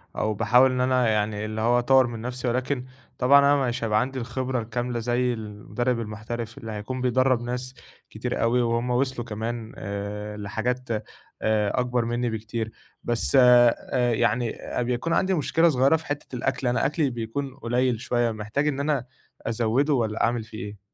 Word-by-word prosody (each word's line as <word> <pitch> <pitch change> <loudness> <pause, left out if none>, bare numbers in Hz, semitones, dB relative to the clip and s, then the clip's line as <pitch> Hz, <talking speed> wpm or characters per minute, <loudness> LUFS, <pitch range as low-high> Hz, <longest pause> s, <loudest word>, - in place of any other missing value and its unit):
أو 110 0 0
باحاول 120 +5 +4
إن 125 - 0
أنا 125 -1 +2
يعني 105 0 0
اللي 110 0 -4
هو 120 +2 +3
أطوّر 130 +1 +4
من 115 -2 -6
نفسي. 125 +1 -4
ولكن 125 +1 -1 0.3
طبعًا 135 +3 +6
أنا 140 -1 +4
مش 120 -1 -2
هيبقى 105 -1 +2
عندي 130 +1 -3
الخبرة 125 +1 -2
الكاملة 120 +1 -3
زي 120 +1 +1
المُدرِّب 110 +3 -3
المحترف 115 +2 -5
اللي 115 -4 -7
هيكون 110 +5 -5
بيدرَّب 130 0 +2
ناس 125 +1 -4 0.4
كتير - - -3
أوي. 120 +2 +3
وهم 115 +1 0
وصلوا 125 -1 0
كمان 115 +2 -4
آآ 105 +1 -5
لحاجات 115 +5 -3 0.5
آآ 110 +1 +1
أكبر 125 -1 0
منّي 120 +1 -1
بكتير. 110 0 -4 0.3
بس 120 +3 +1
أ 120 -1 +7 0.4
يعني 115 +1 +1
أ - - -3
بيكون 125 +7 -1
عندي 190 +2 +2
مشكلة 165 +2 +3
صغيرة 135 +2 +4
في 160 - -5
حتّة 145 -3 -5
الأكل. 130 +1 -1
أنا 120 - +1
أكلي 150 0 +1
بيكون 125 +3 -4
قليل 125 -2 0
شوية، 120 -1 +1
محتاج 110 +7 -2
إن 140 -2 -1
أنا 140 -3 0 0.4
أزَوِّده 120 +6 +1
والّا 115 -4 0
أعمل 115 -1 +1
فيه 110 0 -11
إيه؟ 105 -1 -9
120 Hz, 170 wpm, -25 LUFS, 110-130 Hz, 0.5 s, أ